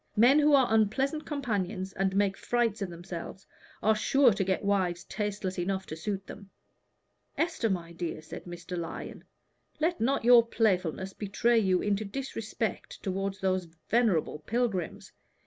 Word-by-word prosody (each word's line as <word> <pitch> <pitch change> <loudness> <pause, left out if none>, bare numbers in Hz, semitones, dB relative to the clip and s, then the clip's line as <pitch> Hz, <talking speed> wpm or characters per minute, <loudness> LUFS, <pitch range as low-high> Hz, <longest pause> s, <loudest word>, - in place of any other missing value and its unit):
"Men 245 +7 +6
who 295 -1 +5
are 265 -2 +5
unpleasant 265 +8 +1
companions 205 - -2
and 190 0 0
make 200 -1 +2
frights 230 -2 0
of 195 - -2
themselves, 175 +2 -8 0.4
are 220 - +5
sure 255 +2 +4
to 195 - 0
get 190 +1 -1
wives 185 -4 +1
tasteless 205 -3 -3
enough 190 +2 -1
to 155 - -6
suit 195 +4 -4
them." 200 -1 -11 0.9
"Esther, 325 -9 0
my 170 -3 -3
dear," 170 -2 -4
said - - -9
Mr. 175 0 -7
Lyon, 170 -1 -6 0.6
"let 330 0 0
not 265 +3 +1
your 240 -1 +8
playfulness 190 -5 0
betray 230 +3 +2
you 190 -4 +2
into 205 +1 0
disrespect 225 -2 -4
toward 195 0 -2
those 185 -1 +1 0.2
venerable 215 -10 +2
pilgrims. 210 -1 -2
200 Hz, 145 wpm, -29 LUFS, 185-230 Hz, 0.9 s, your